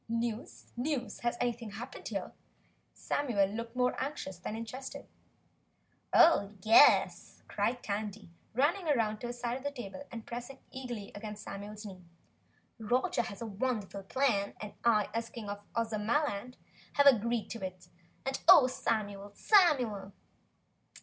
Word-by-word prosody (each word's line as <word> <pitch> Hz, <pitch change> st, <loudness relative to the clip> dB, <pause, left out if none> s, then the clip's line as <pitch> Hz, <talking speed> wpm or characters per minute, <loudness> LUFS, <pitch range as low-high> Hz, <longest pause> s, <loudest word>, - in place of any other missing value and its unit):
"News? 230 Hz, 0 st, -3 dB
NEWS? 250 Hz, -3 st, -2 dB
Has 240 Hz, 0 st, -1 dB
anything 235 Hz, -2 st, -2 dB
happened 230 Hz, +6 st, -8 dB
here?" -, -, -4 dB, 0.6 s
Samuel 240 Hz, -9 st, 0 dB
looked 230 Hz, +4 st, -6 dB
more 250 Hz, 0 st, +2 dB
anxious 225 Hz, -, -4 dB
than 210 Hz, -, -5 dB
interested. 250 Hz, +4 st, -7 dB, 1.1 s
"Oh, 205 Hz, -11 st, +5 dB
YES!" 225 Hz, +6 st, +5 dB
cried 245 Hz, +1 st, -1 dB
Tandy, 205 Hz, -2 st, -4 dB, 0.2 s
running 325 Hz, +9 st, +2 dB
round 225 Hz, -8 st, +1 dB
to 240 Hz, -, -3 dB
his 240 Hz, 0 st, -6 dB
side 240 Hz, 0 st, -1 dB
of 265 Hz, -, -11 dB
the 285 Hz, -, 0 dB
table 240 Hz, -5 st, -8 dB
and 230 Hz, -2 st, -7 dB
pressing 245 Hz, +3 st, -7 dB
eagerly 245 Hz, -6 st, -6 dB
against 210 Hz, 0 st, -7 dB
Samuel's 205 Hz, +2 st, -7 dB
knee. 185 Hz, -3 st, -9 dB, 0.8 s
"Roger 240 Hz, +2 st, +1 dB
has 210 Hz, -1 st, -6 dB
a -, -, -4 dB
wonderful 210 Hz, -2 st, -2 dB
plan 200 Hz, -1 st, 0 dB
and 210 Hz, -1 st, -7 dB
I 215 Hz, -3 st, +4 dB
as 230 Hz, 0 st, -2 dB
King 230 Hz, -4 st, -8 dB
of 205 Hz, 0 st, -5 dB
Ozamaland 230 Hz, +2 st, -1 dB, 0.4 s
have 285 Hz, -, +4 dB
agreed 235 Hz, -4 st, +4 dB
to 230 Hz, -3 st, -6 dB
it, 185 Hz, -1 st, -7 dB, 0.4 s
and 270 Hz, 0 st, -2 dB
oh, 265 Hz, -, +10 dB
Samuel, 205 Hz, -5 st, -2 dB
SAMUEL!" 250 Hz, -, +3 dB
230 Hz, 140 wpm, -32 LUFS, 205-250 Hz, 1.1 s, oh